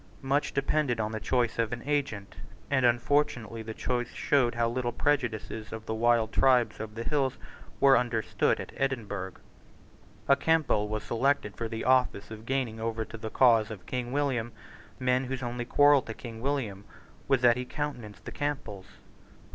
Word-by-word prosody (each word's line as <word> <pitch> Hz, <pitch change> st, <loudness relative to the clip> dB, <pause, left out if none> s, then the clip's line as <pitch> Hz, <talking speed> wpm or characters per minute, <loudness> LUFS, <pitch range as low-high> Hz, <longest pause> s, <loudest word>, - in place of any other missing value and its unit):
Much 140 Hz, +2 st, +1 dB
depended 140 Hz, -3 st, 0 dB
on 110 Hz, 0 st, -1 dB
the 110 Hz, -, -3 dB
choice 120 Hz, 0 st, 0 dB
of 115 Hz, 0 st, +1 dB
an 120 Hz, -1 st, -5 dB
agent; 140 Hz, -9 st, -2 dB, 0.4 s
and 130 Hz, -3 st, +4 dB
unfortunately 120 Hz, -2 st, +1 dB
the 110 Hz, 0 st, -6 dB
choice 120 Hz, +1 st, -2 dB
showed 125 Hz, -5 st, +1 dB
how 120 Hz, 0 st, +2 dB
little 120 Hz, +1 st, -1 dB
the -, -, -21 dB
prejudices 115 Hz, -6 st, -1 dB
of 110 Hz, 0 st, -7 dB
the 110 Hz, -, -3 dB
wild 115 Hz, 0 st, +2 dB
tribes 125 Hz, -3 st, +3 dB
of 110 Hz, 0 st, -6 dB
the 115 Hz, -, -4 dB
hills 135 Hz, -1 st, 0 dB, 0.4 s
were 135 Hz, -1 st, +7 dB
understood 120 Hz, -2 st, +1 dB
at -, -, -7 dB
Edinburgh. 105 Hz, -8 st, -2 dB, 0.9 s
A 140 Hz, -, +6 dB
Campbell 145 Hz, -8 st, +2 dB
was 110 Hz, 0 st, -3 dB
selected 115 Hz, -1 st, 0 dB
for 115 Hz, -, -3 dB
the 115 Hz, 0 st, -5 dB
office 125 Hz, -5 st, +2 dB
of 110 Hz, +1 st, -9 dB
gaining 130 Hz, -4 st, -1 dB
over 110 Hz, 0 st, -2 dB
to -, -, -10 dB
the 110 Hz, 0 st, -5 dB
cause 115 Hz, -3 st, +4 dB
of 100 Hz, -5 st, -9 dB
King 125 Hz, +2 st, -3 dB
William 130 Hz, -5 st, -1 dB, 0.4 s
men 125 Hz, 0 st, +1 dB
whose 130 Hz, 0 st, -4 dB
only 120 Hz, 0 st, -3 dB
quarrel 145 Hz, +2 st, +5 dB
to 110 Hz, -2 st, -8 dB
King 115 Hz, -2 st, -9 dB
William 120 Hz, -8 st, -2 dB, 0.4 s
was 135 Hz, -3 st, +3 dB
that 120 Hz, -1 st, +6 dB
he 125 Hz, -, -3 dB
countenanced 125 Hz, -6 st, -6 dB
the -, -, -6 dB
Campbells. 135 Hz, -10 st, -4 dB
120 Hz, 175 wpm, -29 LUFS, 110-135 Hz, 0.9 s, were